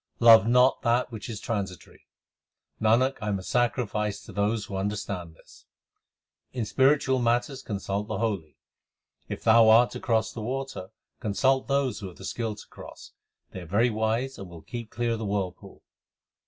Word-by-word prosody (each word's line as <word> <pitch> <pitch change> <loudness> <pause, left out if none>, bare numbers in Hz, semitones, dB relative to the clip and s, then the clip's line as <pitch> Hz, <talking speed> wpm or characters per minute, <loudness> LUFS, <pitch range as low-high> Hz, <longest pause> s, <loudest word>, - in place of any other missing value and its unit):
Love 115 -3 +8
not 125 +2 +4
that 120 0 +1
which 110 +1 -7
is 110 -3 -5
transitory; 100 -6 -5 0.7
Nanak, 120 +5 +3
I 105 - -4
am 100 -2 0
a 95 - -8
sacrifice 110 -3 -1
to - - -11
those 105 +2 0
who 100 - -7
understand 95 -4 -4
this. - - -20 0.9
In 120 -3 -2
spiritual 135 +1 +3
matters 120 +3 0
consult 100 -2 -3
the - - -3
holy: 100 - -3 0.7
If - - -6
thou 115 0 +6
art 115 +2 +6
to - - -6
cross 110 -2 0
the 115 - -6
water, 130 -5 -4 0.3
consult 130 +6 +1
those 140 -2 0
who 100 - -6
have 90 - -12
the 95 - -10
skill 110 +1 -3
to 105 - -13
cross: - - -12 0.4
They - - -7
are 85 - -10
very 115 +7 +2
wise 110 +5 -1
and 95 -2 -8
will 85 -2 -12
keep 120 -2 -7
clear 120 +1 -2
of 115 - -2
the 110 - -4
whirlpool. 100 -3 -4
110 Hz, 175 wpm, -27 LUFS, 100-120 Hz, 0.9 s, Love